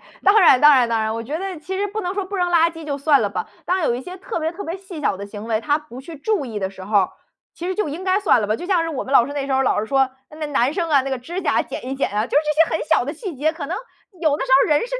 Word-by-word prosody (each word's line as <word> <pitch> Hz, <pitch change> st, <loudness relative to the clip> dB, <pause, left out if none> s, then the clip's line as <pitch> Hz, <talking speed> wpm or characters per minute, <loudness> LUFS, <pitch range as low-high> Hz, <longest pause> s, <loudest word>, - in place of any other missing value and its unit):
哎， -, -, -24 dB, 0.2 s
当 405 Hz, +2 st, +6 dB
然 295 Hz, -8 st, +6 dB
当 295 Hz, 0 st, +8 dB
然 245 Hz, -3 st, +4 dB
当 230 Hz, -1 st, +1 dB
然。 220 Hz, 0 st, -1 dB
我 230 Hz, -, -4 dB
觉 290 Hz, +8 st, -4 dB
得 380 Hz, -2 st, -5 dB
其 375 Hz, +4 st, -5 dB
实 410 Hz, -, 0 dB
不 420 Hz, +2 st, -4 dB
能 360 Hz, -1 st, -3 dB
说 400 Hz, -2 st, -2 dB
不 400 Hz, +2 st, -5 dB
扔 355 Hz, -1 st, +1 dB
垃 335 Hz, -1 st, +4 dB
圾 325 Hz, -1 st, -10 dB
就 285 Hz, -2 st, -3 dB
算 285 Hz, 0 st, +3 dB
了 -, -, +1 dB
吧， -, -, -4 dB, 0.2 s
但 370 Hz, 0 st, 0 dB
有 240 Hz, -, +2 dB
一 245 Hz, -, -4 dB
些 360 Hz, +7 st, -9 dB
特 380 Hz, 0 st, -5 dB
别 320 Hz, +1 st, -1 dB
特 405 Hz, +4 st, -8 dB
别 335 Hz, +3 st, -4 dB
细 375 Hz, -4 st, -9 dB
小 200 Hz, -, 0 dB
的 200 Hz, -, -7 dB
行 205 Hz, +1 st, -8 dB
为 220 Hz, -1 st, 0 dB
他 290 Hz, +2 st, +1 dB
不 295 Hz, -4 st, -11 dB
去 315 Hz, +4 st, -10 dB
注 390 Hz, +2 st, -1 dB
意 220 Hz, -3 st, -5 dB
的 190 Hz, -1 st, -2 dB
时 190 Hz, -1 st, -12 dB
候 210 Hz, +1 st, 0 dB
儿， 185 Hz, -, +1 dB, 0.4 s
其 345 Hz, -, -7 dB
实 375 Hz, -, -1 dB
就 425 Hz, -6 st, -1 dB
应 325 Hz, +6 st, -6 dB
该 375 Hz, +1 st, +2 dB
算 395 Hz, -, +3 dB
了 210 Hz, -, -1 dB
吧。 215 Hz, +2 st, 0 dB
就 -, -, -8 dB
像 370 Hz, -4 st, +2 dB
是 330 Hz, -, -2 dB
我 290 Hz, -5 st, -3 dB
们 265 Hz, -, -6 dB
老 240 Hz, -3 st, +6 dB
师 285 Hz, -, -6 dB
那 285 Hz, -1 st, -3 dB
时 275 Hz, -, -2 dB
候 265 Hz, -, +3 dB
老 255 Hz, -, +1 dB
师 215 Hz, -, -4 dB
说： 270 Hz, +1 st, +2 dB, 0.2 s
“那 305 Hz, 0 st, -5 dB
男 275 Hz, -2 st, +1 dB
生 335 Hz, 0 st, -2 dB
啊， 280 Hz, -3 st, +4 dB
那 275 Hz, -, -4 dB
个 265 Hz, -, -1 dB
指 345 Hz, +10 st, -5 dB
甲 -, -, +2 dB
剪 -, -, -6 dB
一 265 Hz, -, -3 dB
剪 275 Hz, -, -1 dB
啊。 210 Hz, +2 st, 0 dB
“就 -, -, -10 dB
是 -, -, +1 dB
这 305 Hz, +2 st, +3 dB
些 -, -, -1 dB
很 -, -, -5 dB
小 320 Hz, -, +3 dB
的 285 Hz, -, -4 dB
细 340 Hz, +1 st, -6 dB
节 310 Hz, +4 st, +1 dB
可 315 Hz, -4 st, -6 dB
能 355 Hz, -, -3 dB, 0.5 s
有 310 Hz, -3 st, +3 dB
的 -, -, -1 dB
时 265 Hz, -, -7 dB
候 -, -, 0 dB
人 295 Hz, -, +4 dB
是 -, -, -3 dB
300 Hz, 380 characters per minute, -21 LUFS, 255-355 Hz, 0.5 s, 当